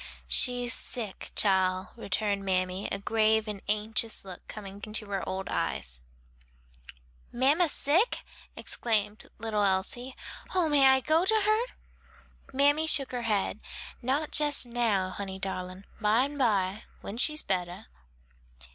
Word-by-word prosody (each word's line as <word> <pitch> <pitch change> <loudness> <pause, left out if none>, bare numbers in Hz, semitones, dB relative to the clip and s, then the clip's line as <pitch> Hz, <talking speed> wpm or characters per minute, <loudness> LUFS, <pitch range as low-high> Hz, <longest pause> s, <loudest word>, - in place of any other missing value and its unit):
"She's 245 -2 +3
sick, 220 -6 -3
chile," 190 -2 +2
returned 200 -2 -2
mammy, 185 0 -1
a - - -1
grave 220 +1 +2
and 205 -2 -5
anxious 215 +1 -1
look 185 -2 -10
coming 200 -1 -9
into 215 0 -2
her 195 -1 -2
old 190 0 -4
eyes. 60 0 -1 1.3
"Mamma 290 +8 +3
sick?" 325 - +1 0.3
exclaimed 215 -2 -1
little 215 -2 -2
Elsie, 200 +6 0 0.4
"oh, 350 -4 +2
may 280 -2 +6
I 265 0 +5
go 315 +5 +2
to 435 +3 +2
her?" 435 +4 +1 0.8
Mammy 290 +4 +3
shook 280 -3 +4
her 245 -1 -3
head. 205 0 0 0.4
"Not 285 +5 +1
jes 295 -3 +1
now, 225 -6 0
honey 190 0 -6
darlin', 185 0 -5
byme 235 +7 +2
by, 210 -6 0 0.2
when 215 +4 -7
she's 305 +3 +3
bettah." 180 -2 -3
220 Hz, 130 wpm, -28 LUFS, 195-265 Hz, 1.3 s, may